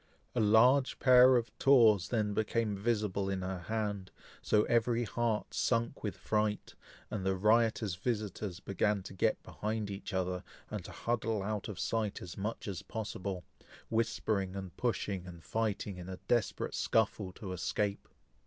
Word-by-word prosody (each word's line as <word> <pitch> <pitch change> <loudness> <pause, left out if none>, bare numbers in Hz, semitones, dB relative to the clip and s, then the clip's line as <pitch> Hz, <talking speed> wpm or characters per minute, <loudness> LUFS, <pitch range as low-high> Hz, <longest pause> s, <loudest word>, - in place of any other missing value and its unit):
A 125 - 0
large 125 +6 +5
pair 130 0 +7
of 120 -1 0
tawse 115 -9 +6
then 105 -4 0
became 110 0 0
visible 100 -2 0
in 95 -1 -2
her 95 0 -3
hand, 100 0 -3 0.3
so 105 0 +3
every 120 +1 +2
heart 115 0 -1
sunk 115 -1 0
with 105 - -3
fright, 105 -1 -1 0.4
and 100 -3 -3
the 95 0 +1
riotous 110 0 +3
visitors 105 -2 -3
began 100 0 0
to - - -9
get 95 - +1
behind 105 -1 -3
each 100 +2 -6
other, 90 -1 -1 0.3
and - - -4
to - - -8
huddle 115 -3 -1
out 105 0 -3
of 105 -5 -6
sight 110 -3 -1
as 85 - -8
much 105 +3 -4
as 95 -5 -4
possible, 100 -4 -5 0.5
whispering 105 -4 0
and 95 -2 -6
pushing, 100 -5 -2
and 85 -2 -10
fighting, 105 +1 -2
in 90 0 -8
a 95 - -5
desperate 120 -3 0
scuffle 105 -3 +1
to 95 -3 -6
escape. 100 +3 -2
105 Hz, 155 wpm, -33 LUFS, 95-115 Hz, 0.5 s, pair